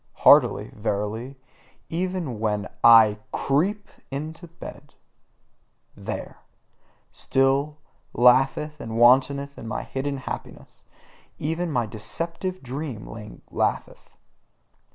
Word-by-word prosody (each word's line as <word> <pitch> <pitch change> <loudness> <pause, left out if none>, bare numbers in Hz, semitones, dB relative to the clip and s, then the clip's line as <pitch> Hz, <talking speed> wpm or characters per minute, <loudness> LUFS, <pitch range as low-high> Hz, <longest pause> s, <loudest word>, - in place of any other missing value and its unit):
Heartily, - - +6
verily, 105 +4 -3 0.5
even 170 - -3
when 105 -2 -1 0.2
I 110 -3 +7
CREEP 190 +10 0 0.2
into 155 +5 -6
bed: 160 -3 -12 1.0
there, - - -6 0.7
still 135 +3 +1 0.3
laugheth 135 +5 +3
and 115 -3 -5
wantoneth 135 +3 +3
my 110 -2 -4
hidden 140 +1 -3
happiness; 135 - -8 0.5
even 165 +3 -2
my 120 -5 +1
deceptive 165 - -3
dream 130 -3 -5 0.5
laugheth. - - -3
135 Hz, 85 wpm, -24 LUFS, 115-155 Hz, 1.0 s, I